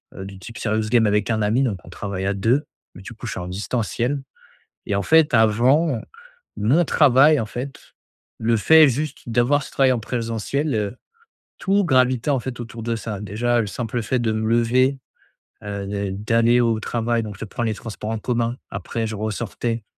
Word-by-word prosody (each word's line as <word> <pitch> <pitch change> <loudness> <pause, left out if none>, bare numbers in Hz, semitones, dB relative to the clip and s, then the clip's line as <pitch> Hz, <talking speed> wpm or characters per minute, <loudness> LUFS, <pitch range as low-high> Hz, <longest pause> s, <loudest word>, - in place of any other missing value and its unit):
heu, 95 - -7
du 95 -1 -10
type 115 +5 -10
Serious 110 0 -1
Game 120 -2 +4
avec 105 +1 +1
un 110 -1 +1
ami. 110 +6 +2
Donc, 105 -8 -1
on - - -14
travaille 100 -2 -5
à 100 - +1
2, 120 +9 +1 0.3
mais 90 - -11
du 115 - -9
coup, 120 +2 -8
je - - -4
suis - - -5
en 90 - -6
distanciel 115 - -2 0.7
et 100 - 0
en 100 - +1
fait, 160 -3 +4
avant 120 +5 +3 0.6
mon 140 +12 +3
travail, 145 +1 +5
en 110 - -2
fait, 130 +5 -8 0.5
le 115 +1 +2
fait 160 +7 +7
juste 140 +2 -4
d'avoir 125 +5 +2
ce - - -11
travail 135 -1 +3
en 120 - -1
présentiel, 115 +5 -2
heu, 105 +2 -2 0.6
tout 200 +1 +2
gravitait, 130 -2 +2
en 135 - +2
fait, 120 0 -6
autour 115 -1 -7
de 115 0 -1
ça. 105 -2 -5
Déjà, 115 +4 0
le 105 - -2
simple 120 +2 -3
fait 125 +4 0
de 115 -2 0
me 110 0 -1
lever, 125 +4 +2 0.7
heu, 100 -1 -4
d'a 100 0 -3
d'aller 115 +4 +2
au 115 -2 +2
travail, 115 +1 -1
donc 105 -2 -7
je - - -5
prends 120 +3 -4
les 110 -2 0
transports 110 0 -7
en 110 - -2
commun. 120 +1 -1
Après, 110 +4 -3
je 110 - -4
ressortais, 110 +1 -3
115 Hz, 200 wpm, -22 LUFS, 105-125 Hz, 0.7 s, fait